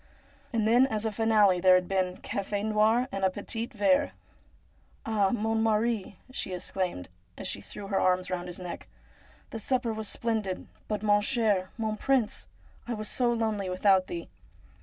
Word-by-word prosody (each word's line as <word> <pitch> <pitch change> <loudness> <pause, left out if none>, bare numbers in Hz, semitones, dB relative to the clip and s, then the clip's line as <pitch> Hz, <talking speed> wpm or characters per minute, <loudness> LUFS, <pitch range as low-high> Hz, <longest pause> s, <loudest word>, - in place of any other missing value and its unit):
And 225 -3 +1
then 245 +4 +5
as 220 -3 -2
a 220 - 0
finale 210 -4 +4
there 185 0 +6
had 180 -1 +1
been 185 -1 0
cafe 200 +1 -3
noir 220 +3 +3
and 195 0 -4
a 190 - +5
petit 225 +4 -3
verrc. 200 -4 +2 0.5
' - - -35
Ah, 210 -3 +2
mon 225 0 0
mari! 220 -3 0
' - - -20
she 190 -8 -3
exclaimed, 180 - -3 0.3
as - - -3
she - - -2
threw 205 - -9
her 195 -1 0
arms 185 0 +1
round 180 -1 -3
his 180 - -7
neck, 180 -2 -7 0.3
' - - -28
the 225 - -4
supper 245 +1 0
was 220 -1 -4
splendid, 220 -6 -2 0.2
but 210 -1 -3
mon 205 -1 +4
cher, 210 -6 +1
mon 220 -2 -2
prince, 255 -3 0 0.4
I 240 - -2
was 215 -1 -4
so 245 -2 +2
lonely 220 -4 -1
without 185 0 +3
thee.' 170 -1 -5
210 Hz, 180 wpm, -28 LUFS, 190-225 Hz, 0.5 s, there